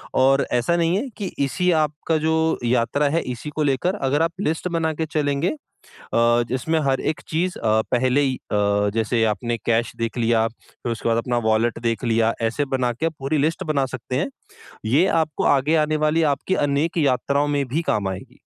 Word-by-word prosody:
और 135 +1 +4
ऐसा 125 +8 +2
नहीं 170 +1 +2
है 250 +7 -2
कि 205 - -4 0.2
इसी 180 +7 0
आपका 155 0 0
जो 160 +1 +1 0.3
यात्रा 125 +4 +1
है 165 +3 +1
इसी 125 +5 -6
को 155 - 0
लेकर 145 +7 +1
अगर 145 -4 0
आप 165 0 +2
लिस्ट 160 -1 -1
बना 165 -2 -1
के 160 +1 -2
चलेंगे 145 0 0
अ, 310 - -4 0.9
जिसमें 145 +6 0
हर 135 -1 +1
एक 155 - -2
चीज़ 180 +3 -1
अ, 110 -1 +2
पहले 130 +3 +2
ही 135 -2 +1
अ, 105 -1 0
जैसे 115 +1 +1
आपने 110 +2 -1
कैश 115 0 +1
देख 115 +1 -3
लिया, 115 -1 +2
फिर 115 +1 -8
उसके 115 - -3
बाद 115 0 +2
अपना 120 +1 0
वॉलेट 110 +1 +1
देख 115 +1 -1
लिया 115 -1 +2
ऐसे 115 +6 0
बना 125 -2 0
के 140 +8 -2
आप 165 - -2
पूरी 140 +3 -1
लिस्ट 160 +6 0
बना 140 -2 +1
सकते 125 +1 -5
हैं। 145 - -1 0.6
ये 140 +11 +3 0.2
आपको 155 -2 -3
आगे 145 +4 +1
आने 155 0 -1
वाली 160 +2 +2
आपकी 185 +7 -2
अनेक 145 +5 0
यात्राओं 140 0 +1
में 145 -1 0
भी 145 +7 -1
काम 100 -2 0
आएगी। 95 -1 -8
140 Hz, 195 wpm, -22 LUFS, 115-155 Hz, 0.9 s, और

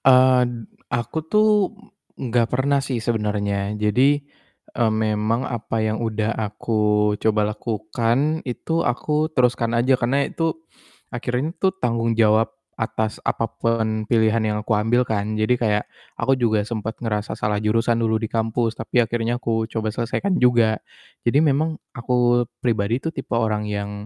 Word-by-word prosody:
Eee, 130 -1 +6
d - - -5 0.4
aku 120 +6 -2
tuh, 215 +2 +4 0.7
m 130 - -5
nggak 120 -1 +3
pernah 140 +2 +1
sih 135 -3 -2
sebenernya 105 -2 -1
jadi, 125 +7 +3 0.6
eee, 110 -2 +3
memang 110 +2 0
apa 115 -2 -2
yang 110 0 -1
udah 110 -1 -1
aku 105 -1 0
coba 105 -1 +2
lakukan, 115 +8 -1
itu 165 +7 -2
aku 150 +5 0
teruskan 120 -2 +2
aja 125 +3 +3
karena 135 +4 +2
itu, 165 -1 -1 0.6
akhirnya 125 +5 -2
tuh, 190 -1 +3
tanggung 115 -7 0
jawab 110 0 +4 0.3
atas 110 -1 -2
apa 115 - 0 0.2
pun 110 -2 0
pilihan 110 -1 +3
yang 105 -1 0
aku 115 - -1
ambil 115 +4 +2
kan 110 0 -1
jadi 110 +3 +2
kayak, 105 -3 +1 0.3
aku 130 +3 +2
juga 110 -3 +2
sempet 110 -1 -4
ngerasa 105 -3 -3
salah 105 -1 -1
jurusan 115 +2 +1
dulu 110 -1 +1
di 110 0 -2
kampus 115 0 -1
tapi 115 +2 -1
akhirnya 120 +1 -1
aku 115 -2 -1
coba 110 -1 -2
selesaikan 125 - -1
juga, 120 -3 +3 0.4
jadi 120 +4 +3
memang 155 +2 +1 0.2
aku 120 0 +2 0.2
pribadi 115 -1 +1
tuh 160 - -2
tipe 135 - -7
orang 110 -2 0
yang, 100 0 -3
115 Hz, 150 wpm, -22 LUFS, 110-125 Hz, 0.7 s, Eee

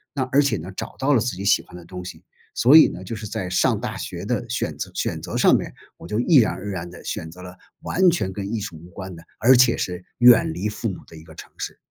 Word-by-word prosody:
那 135 - 0
而 140 - +5
且 140 -7 +1
呢 90 +3 -8
找 - - -6
到 140 +2 +1
了 130 - +4
自 120 -3 -2
己 95 +2 -6
喜 100 - +4
欢 - - -16
的 90 -1 -11
东 90 +1 -8
西。 90 - -10 0.3
所 130 +5 +5
以 160 - +8
呢， 90 - -7
就 105 +5 -6
是 105 0 -7
在 95 -2 -4
上 90 - +2
大 - - -5
学 - - -6
的 - - -2
选 - - -2
择 - - -5
选 - - -2
择 - - -5
上 - - +5
面， - - -2 0.3
我 - - -11
就 105 +5 -2
毅 155 +7 +3
然 115 -4 +4
而 105 +2 -7
然 90 -3 -5
地 90 - -13
选 80 - -5
择 90 +2 -13
了 90 0 -10 0.3
完 185 0 +3
全 130 - -2
跟 100 0 -5
艺 115 - -1
术 100 -5 -7
无 85 +3 -14
关 95 0 -8
的， 80 - -13 0.2
而 130 +4 +6
且 125 -1 +5
是 90 0 -4 0.2
远 120 -7 +6
离 95 +6 -3
父 105 +2 -4
母 95 - -6
的 - - -14
一 80 - -12
个 80 0 -15
城 - - -12
市。 - - -6
95 Hz, 300 characters per minute, -22 LUFS, 90-120 Hz, 0.3 s, 以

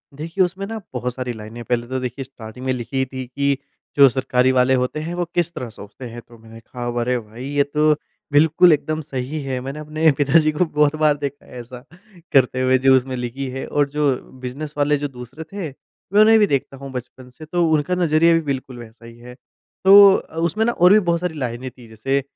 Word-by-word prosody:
देखिए, 165 +6 -1
उसमें 185 +2 -3
ना 225 +1 -5
बहुत 125 0 -3
सारी 125 -1 -4
लाइनें 110 +2 -9
पहले 120 0 -2
तो 130 0 -3
देखिए 125 +1 -5
स्टार्टिंग 125 -1 -11
में 130 - +1
लिखी 125 +2 -5
ही 130 - +2
थी 130 0 -7
कि 140 +2 0 0.4
जो 140 -1 +9
सरकारी 130 0 +1
वाले 130 0 +3
होते 125 +4 -1
हैं 160 +3 -5
वो 175 - -1
किस 170 -1 0
तरह 125 - -6
सोचते 110 +3 -11
हैं 120 +1 -9
तो 120 -1 -16
मैंने 115 0 -14
कहा 120 +2 -8 0.2
"अरे! 125 +1 0
भाई 115 +3 -10
ये 145 +1 +1
तो 150 +2 +2 0.4
बिल्कुल 160 +4 +5
एकदम 155 +1 -2
सही 135 +1 -5
है" 130 -2 -3
मैंने 135 +3 -6
अपने 155 +1 +2
पिताजी 155 +2 +3
को 155 +4 +1
बहुत 150 -1 +1
बार 150 -1 +4
देखा 140 0 -6
है 125 - -10
ऐसा 125 +1 -10 0.5
करते 130 -1 +3
हुए 130 0 +3
जो 135 0 +7
उसमें 130 0 0
लिखी 125 +2 -4
है 135 +1 -5
और 145 -1 0
जो 145 -2 +1 0.3
बिज़नेस 145 +4 -6
वाले 145 0 +2
जो 145 +1 -3
दूसरे 125 +6 -9
थे 195 -6 -4
उन्होंने 215 +10 +2
भी 210 - +4
देखता 135 -2 -2
हूँ 135 0 -9
बचपन 125 0 -8
से। 125 +5 -13
तो 175 +2 0
उनका 155 +4 +1
नज़रिया 165 -1 +3
भी 165 - +2
बिल्कुल 130 -2 -4
वैसा 115 0 -13
ही 115 0 -13
है 125 +1 -12 0.5
तो 200 0 +9
अ, - - -6
उसमें 175 +7 0
न - - +2
और 180 -4 +5
भी 215 - +7
बहुत 170 -4 0
सारी 180 -1 -3
लाइनें 125 0 -4
थीं 120 -2 -16
जैसे 135 +6 -1
135 Hz, 225 wpm, -21 LUFS, 125-155 Hz, 0.5 s, जो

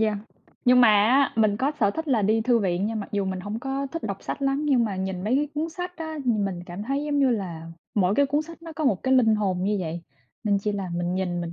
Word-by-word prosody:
yeah. 215 -2 +1 0.5
Nhưng 250 0 +6
mà 240 - +7
á, 225 +7 +4
mình 215 -2 +3
có 270 +6 0
sở 205 -3 +4
thích 320 +8 -5
là 240 -6 +2
đi 220 +3 +2
thư 240 +1 +3
viện, 190 -2 0
nhưng 220 0 -2
mặc 200 - -7
dù 200 -1 0
mình 190 -1 -3
hổng 205 +4 -4
có 270 +2 -3
thích 330 - -4
đọc 200 -3 -4
sách - - -5
lắm, 275 +2 +1
nhưng 260 -5 +3
mà 200 -4 -3
nhìn 190 -1 -3
mấy 230 +5 +2
cái 295 +1 0
cuốn 310 +2 -1
sách 360 +1 -6
á, 315 -1 -5
ừm, 220 -5 +1
mình 185 -3 -3
cảm 175 +3 -6
thấy, 275 +6 -2
giống 295 -1 0
như 270 -2 +4
là, 175 -8 -3 0.3
mỗi 195 -1 +2
cái 280 +3 +3
cuốn 290 +2 0
sách 335 +1 -12
nó 330 -1 -8
có 315 - -2
một 210 -9 +1
cái 260 0 +3
linh 225 -4 +5
hồn 190 -4 0
như 205 +1 +1
vậy, 165 0 -4 0.4
nên 205 -2 +2
chỉ 210 +1 -2
là 195 -3 -3
mình 175 +1 -1
nhìn 180 -2 -1
mình 170 0 -5
215 Hz, 285 wpm, -25 LUFS, 195-275 Hz, 0.5 s, mà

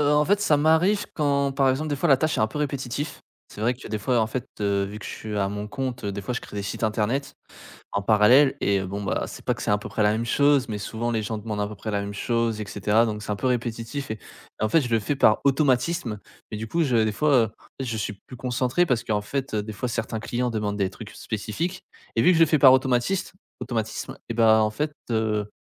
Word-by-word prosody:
Heu, 145 0 +3
en 150 0 +4
fait 200 +5 +2
ça 155 -7 +3
m'arrive 160 +8 +3
quand, 140 -2 +1
par 135 -1 +3
exemple 150 +4 -1
des 145 - -1
fois 140 - 0
la 135 - +7
tâche 155 +4 0
est - - +2
un 110 - +4
peu 110 - -6
répétitif. 140 0 -3 0.3
C'est - - -11
vrai 120 +3 +2
que 125 - -12
des 110 -1 -3
fois 120 +4 +1
en 110 - +2
fait, 125 +3 -4
heu, 100 -1 +1
vu 100 +2 -7
que - - -11
je - - -5
suis 110 -1 -6
à 100 -1 +1
mon 105 +1 -5
compte, 130 -1 -4
heu, 100 - -1
des 100 - -4
fois 125 +5 -4
je - - -2
crée - - -10
des 100 - -2
sites 100 - -5
internet, 110 +6 0 0.6
en 100 - 0
parallèle 120 +7 +5
et 100 0 +2
bon, 95 +2 -4
bah, - - -1
c'est - - -10
pas - - +1
que - - -11
c'est - - -1
à 105 - +4
peu - - -8
près 110 - 0
la 105 0 +4
même 110 +2 -1
chose, 140 +2 +3
mais 105 -2 -3
souvent 115 +3 -3
les 110 -2 0
gens 110 +1 -3
demandent 105 -1 -4
à 105 - -1
peu 105 - -8
près 110 +3 -5
la 100 -1 0
même 100 0 -5
chose 115 0 0
et 105 - -4
cetera. 105 +3 +2
Donc 105 -1 -4
c'est 105 - -6
un 105 - 0
peu 100 - -3
répétitif 120 +2 -2
et 110 - -3 0.4
en 110 - +2
fait 165 - +5
je 130 - -3
le 115 - +3
fais 110 +7 -1
par 110 -5 +4
automatisme 135 -2 +1 0.3
mais 105 - -4
du 110 - -5
coup 165 +9 0
je 130 -6 +2
des 110 - 0
fois 140 +1 +3
en - - -8 0.3
fait 135 - -1
je 115 -2 -2
suis 105 - -3
plus 115 +6 -13
concentré 125 +7 +1
parce 125 -7 0
qu'en 105 -1 0
fait, 135 +4 -4
heu, 105 - 0
des 110 +1 -7
fois 125 +5 -3
certains 110 -1 -3
clients 120 +2 -1
demandent 105 -2 -2
des 95 -2 +1
trucs 110 +2 -10
spécifiques 140 - -4 0.3
et 115 - +4
vu - - +6
que 165 - +2
je - - +1
le 165 - +8
fais 155 0 +2
par 135 -2 +8
automatisme- 130 +9 +1 0.3
automatisme 115 -3 -3
et - - +1
bah, 110 -1 +5
en 110 - +2
fait, 150 +6 -3 0.2
heu, 110 -2 0
115 Hz, 275 wpm, -25 LUFS, 105-140 Hz, 0.6 s, le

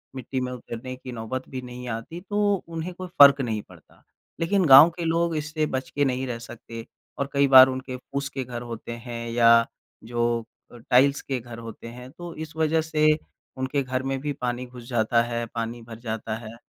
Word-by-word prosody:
मिट्टी 130 +1 -4
में 125 - -3
उतरने 125 0 -7
की 130 0 -9
नौबत 120 +3 -5
भी 130 -1 -5
नहीं 125 0 -8
आती 115 +9 -5
तो 205 0 +1 0.2
उन्हें 165 +2 -5
कोई 185 +1 -7
फ़र्क 140 -1 +9
नहीं 110 -4 -2
पड़ता। - - -19 0.4
लेकिन 185 +3 +2
गाँव 140 +3 +10
के 170 - -3
लोग 165 0 +1
इससे 155 +1 -1
बच 130 -3 -3
के 145 +2 0
नहीं 130 0 -1
रह 120 -2 -4
सकते 115 0 -9 0.3
और 140 0 -2
कई 140 0 +4
बार 130 -1 +10
उनके 130 0 -5
पूँस 140 +2 -5
के 135 -1 -4
घर 120 -1 -6
होते 120 -1 -7
हैं 115 -1 -5
या 115 0 +6 0.4
जो 120 0 -1 0.3
अ, 120 - -12
टाइल्स 130 +4 +3
के 135 -2 -3
घर 120 -1 -10
होते 115 0 -9
हैं, 125 +2 -10
तो 175 +1 -9
इस 160 0 -8
वज़ह 160 0 +2
से 155 -1 +1 0.5
उनके 130 +2 -1
घर 130 0 -2
में 135 0 -2
भी 145 +2 -3
पानी 125 -1 -3
घुस 125 -1 -12
जाता 115 -1 +2
है, 120 0 -3
पानी 115 +1 -5
भर 115 -1 -11
जाता 110 -2 -4
है। 115 0 -10
130 Hz, 205 wpm, -25 LUFS, 120-140 Hz, 0.5 s, गाँव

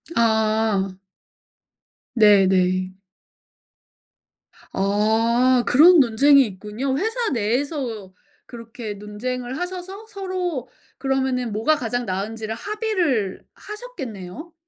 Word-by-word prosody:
아. 220 -3 +1 1.2
네 205 -4 +6
네. 185 0 +1 1.8
어. 225 +5 +2
그런 330 +6 +7
논쟁이 275 +3 +5
있군요. 215 +7 -4
회사 450 - -1
내에서 235 - -2 0.3
그렇게 230 -2 -8
논쟁을 245 +5 -5
하셔서 370 +3 -6
서로 370 - -4 0.3
그러면은 265 -3 -1
뭐가 225 +9 +2
가장 245 -2 -3
나은지를 215 +3 -4
합의를 355 - -1
하셨겠네요. 310 - -9
240 Hz, 195 characters per minute, -22 LUFS, 210-295 Hz, 1.8 s, 그런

